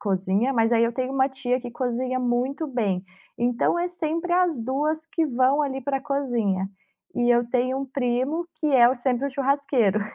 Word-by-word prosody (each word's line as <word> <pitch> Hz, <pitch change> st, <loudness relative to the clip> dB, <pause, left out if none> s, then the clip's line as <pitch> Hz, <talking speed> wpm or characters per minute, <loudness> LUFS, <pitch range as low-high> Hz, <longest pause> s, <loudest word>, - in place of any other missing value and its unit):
cozinha, 200 Hz, +4 st, 0 dB
mas 225 Hz, -2 st, +2 dB
aí 230 Hz, -1 st, +4 dB
eu 230 Hz, 0 st, +2 dB
tenho 255 Hz, +2 st, -3 dB
uma 265 Hz, 0 st, +2 dB
tia 255 Hz, -1 st, -2 dB
que 245 Hz, -1 st, -7 dB
cozinha 255 Hz, +1 st, -2 dB
muito 255 Hz, +5 st, -1 dB
bem. 210 Hz, -9 st, -1 dB, 0.3 s
Então, 245 Hz, +7 st, +1 dB
é 350 Hz, -, 0 dB
sempre 345 Hz, 0 st, -3 dB
as 355 Hz, -5 st, +2 dB
2 295 Hz, +7 st, -1 dB
que 330 Hz, 0 st, 0 dB
vão 265 Hz, +2 st, +2 dB
ali 270 Hz, -1 st, -2 dB
pra 270 Hz, +1 st, -2 dB
cozinha. 240 Hz, -9 st, -1 dB, 0.5 s
E 240 Hz, 0 st, +2 dB
eu 240 Hz, 0 st, +3 dB
tenho 255 Hz, +2 st, 0 dB
um 275 Hz, -, -4 dB
primo 265 Hz, +5 st, -1 dB
que 310 Hz, -, -2 dB
é 240 Hz, -2 st, +7 dB
o 255 Hz, -, +1 dB
sempre 250 Hz, +1 st, -1 dB
o -, -, -3 dB
churrasqueiro. 275 Hz, -6 st, +1 dB
255 Hz, 190 wpm, -24 LUFS, 240-280 Hz, 0.5 s, é